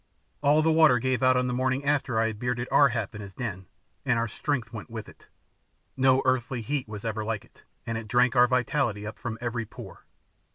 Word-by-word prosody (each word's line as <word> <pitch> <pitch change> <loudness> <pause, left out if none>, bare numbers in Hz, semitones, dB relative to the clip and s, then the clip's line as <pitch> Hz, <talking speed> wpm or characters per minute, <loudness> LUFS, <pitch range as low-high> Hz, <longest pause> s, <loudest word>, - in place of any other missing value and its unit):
All 150 +2 +4
the 160 - +3
water 155 -5 +6
gave 130 +2 0
out 130 0 +4
on 125 - +1
the 125 - -1
morning 130 +2 0
after 140 -5 +1
I 115 - +3
had 110 -2 -3
bearded 125 0 -2
Ar 140 -1 +6
hap 115 -4 -3
in 105 - -7
his 100 -2 -10
den, 95 -7 -5 0.4
and 125 - +1
our 115 0 0
strength 120 0 -3
went 110 -3 -7
with 115 -2 -7
it. - - -17 0.7
No 130 0 +3
earthly 130 -1 0
heat 135 +3 -2
was 105 0 -8
ever 110 -1 -2
like 110 -1 -3
it, - - -24 0.2
and 115 -1 -2
it 110 - -9
drank 125 +4 +3
our 125 0 +6
vitality 125 -4 0
up 110 - -7
from 115 -1 -4
every 120 -2 -3
pore. - - -11
125 Hz, 220 wpm, -27 LUFS, 110-130 Hz, 0.7 s, water